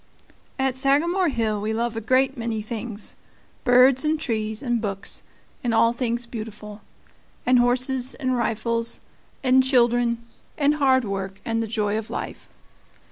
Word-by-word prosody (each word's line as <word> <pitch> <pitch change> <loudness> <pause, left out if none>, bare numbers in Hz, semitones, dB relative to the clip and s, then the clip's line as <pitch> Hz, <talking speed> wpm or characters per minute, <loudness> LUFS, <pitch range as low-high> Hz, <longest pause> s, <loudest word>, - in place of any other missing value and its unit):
At 265 -1 0
Sagamore 330 +7 +2
Hill 220 -5 -1
we 215 +1 -1
love 230 +1 -1
a 225 - -3
great 260 +4 +2
many 230 -3 -3
things 220 -1 -5 0.5
birds 255 +2 +5
and 310 0 +1
trees 220 -4 -2
and 240 -3 0
books, 195 -2 -2 0.4
and 235 -2 +1
all 230 +1 +4
things 240 -1 -2
beautiful, 215 -2 -8 0.6
and 250 0 +5
horses 255 +1 +1
and 255 -1 -1
rifles 230 0 +2 0.4
and 260 0 +5
children 240 -2 +2 0.3
and 290 0 +3
hard 260 -4 +3
work 195 -1 -4
and 230 0 0
the 225 - -2
joy 210 -1 0
of 220 - -8
life. - - -6
235 Hz, 145 wpm, -24 LUFS, 220-260 Hz, 0.6 s, birds